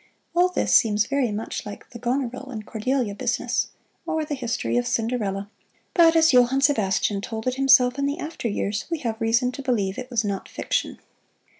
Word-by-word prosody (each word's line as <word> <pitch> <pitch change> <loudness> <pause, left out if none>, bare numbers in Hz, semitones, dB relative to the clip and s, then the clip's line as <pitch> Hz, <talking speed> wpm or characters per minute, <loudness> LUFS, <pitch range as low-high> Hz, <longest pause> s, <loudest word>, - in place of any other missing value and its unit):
All 355 +1 +4
this 360 - 0
seems 215 -1 +4
very 275 -3 0
much 210 +2 -4
like 205 -1 -10
the 235 - -9
Goneril 255 +1 -2
and 215 -5 -6
Cordelia 235 0 -1
business, 200 - -1 0.4
or 315 -1 -2
the 300 - -4
history 235 - -2
of 120 - 0
Cinderella, 215 -4 -1 0.5
but 330 -2 +5
as 320 -3 +5
Johann 250 +2 +4
Sebastian 210 -7 +2
told 220 +1 -5
it 255 - +1
himself 260 -1 +4
in 280 - +1
the 285 +2 -2
after 315 -7 -4
years, 205 -1 -2
we 335 - -1
have 225 -2 -3
reason 230 +3 +2
to 275 - -7
believe 210 -8 -1
it 255 0 -7
was 230 -4 0
not 200 -2 -3
fiction. - - -2
245 Hz, 185 wpm, -24 LUFS, 215-275 Hz, 0.5 s, but